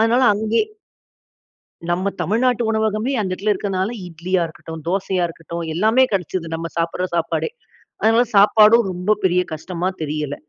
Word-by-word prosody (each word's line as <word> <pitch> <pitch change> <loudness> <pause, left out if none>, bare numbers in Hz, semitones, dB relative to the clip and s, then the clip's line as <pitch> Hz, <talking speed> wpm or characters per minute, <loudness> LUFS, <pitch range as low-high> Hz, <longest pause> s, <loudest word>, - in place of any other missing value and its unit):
அதனால 230 +3 +3
அங்கயே 220 - +1 1.3
நம்ம 185 +3 0
தமிழ்நாட்டு 240 +3 +1
உணவகமே 220 +3 0
அந்த 195 -3 -2
இடத்தில 200 +3 0
இருக்கனால 190 0 -2 0.2
இட்லியா 175 +2 -1
இருக்கட்டும், 160 0 -10
தோசையா 190 -1 0
இருக்கட்டும் 170 +1 -7
எல்லாமே 220 +9 +4
கிடைச்சது, 180 -2 -2
நம்ம 165 +1 -4
சாப்பிடுற 170 +2 -1
சாப்பாடே. 170 - -1 0.5
அதனால 225 +2 +4
சாப்பாடும் 215 +2 +6
ரொம்ப 180 +3 -1
பெரிய 180 -1 +3
கஷ்டமா 175 +3 -4
தெரியல. 150 -1 -3
190 Hz, 130 wpm, -20 LUFS, 170-220 Hz, 1.3 s, சாப்பாடும்